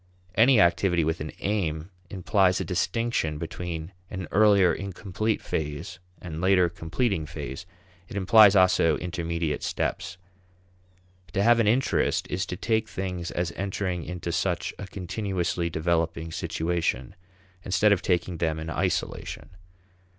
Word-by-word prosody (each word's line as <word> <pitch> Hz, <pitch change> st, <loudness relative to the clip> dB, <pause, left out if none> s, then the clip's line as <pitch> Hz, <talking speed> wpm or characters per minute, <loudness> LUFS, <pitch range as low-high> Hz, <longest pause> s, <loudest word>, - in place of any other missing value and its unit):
Any 115 Hz, +3 st, +5 dB
activity 85 Hz, -1 st, +3 dB
with 80 Hz, +1 st, -1 dB
an 75 Hz, -, -4 dB
aim 90 Hz, -4 st, -2 dB, 0.2 s
implies 95 Hz, 0 st, +2 dB
a 95 Hz, -, -2 dB
distinction 90 Hz, -2 st, -1 dB
between 85 Hz, +1 st, -5 dB, 0.2 s
an 95 Hz, -4 st, -5 dB
earlier 100 Hz, -3 st, +5 dB
incomplete 100 Hz, +2 st, -3 dB
phase 75 Hz, -1 st, -4 dB, 0.2 s
and 80 Hz, -2 st, -6 dB
later 90 Hz, -1 st, +4 dB
completing 85 Hz, +1 st, -2 dB
phase; 75 Hz, 0 st, -7 dB, 0.4 s
it -, -, -8 dB
implies 100 Hz, +1 st, +6 dB
also 90 Hz, -4 st, +4 dB
intermediate 85 Hz, -3 st, -3 dB
steps. 100 Hz, -1 st, -3 dB, 1.2 s
To 100 Hz, -, +1 dB
have 120 Hz, +2 st, +5 dB
an 115 Hz, -, +3 dB
interest 125 Hz, +5 st, +2 dB
is -, -, -1 dB
to -, -, -5 dB
take 110 Hz, -1 st, 0 dB
things 90 Hz, -2 st, -4 dB
as 85 Hz, 0 st, -2 dB
entering 95 Hz, -2 st, -2 dB
into 90 Hz, 0 st, -5 dB
such 85 Hz, +1 st, -1 dB
a 100 Hz, -, -6 dB
continuously 90 Hz, -2 st, -2 dB
developing 80 Hz, 0 st, -1 dB
situation, 80 Hz, -6 st, -2 dB, 0.5 s
instead 105 Hz, +3 st, +3 dB
of 100 Hz, -, +3 dB
taking 90 Hz, -1 st, 0 dB
them 80 Hz, -1 st, -1 dB
in 80 Hz, 0 st, -5 dB
isolation. -, -, -3 dB
90 Hz, 130 wpm, -26 LUFS, 80-100 Hz, 1.2 s, implies